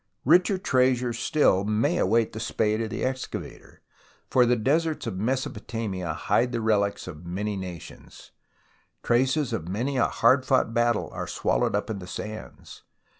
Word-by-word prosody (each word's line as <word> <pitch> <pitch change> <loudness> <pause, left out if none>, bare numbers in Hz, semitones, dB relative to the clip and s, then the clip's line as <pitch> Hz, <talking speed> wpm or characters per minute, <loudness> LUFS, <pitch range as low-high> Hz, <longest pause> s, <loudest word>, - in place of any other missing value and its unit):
Richer 180 - +4
treasures 125 -7 +1
still 110 -12 +3
may 105 +2 +1
await 115 +3 +2
the 110 - -5
spade 110 0 0
of 110 - -2
the - - -4
excavator, 130 0 -6 0.5
for 125 -2 +5
the 125 - +4
deserts 155 +7 0
of 95 - -4
Mesopotamia 110 -6 -3
hide 120 +9 +1
the 120 - -1
relics 105 -2 0
of 80 -2 -9
many 100 +4 -3
nations; 90 -3 -9 0.7
traces 130 +3 +1
of 80 - -3
many 120 +9 -2
a 120 - +3
hard 130 +3 +3
fought 130 -4 +1
battle 120 -1 +1
are - - -5
swallowed - - 0
up 105 - -1
in 100 - -4
the 90 - -9
sands. 110 +4 -8
115 Hz, 155 wpm, -26 LUFS, 100-130 Hz, 0.7 s, for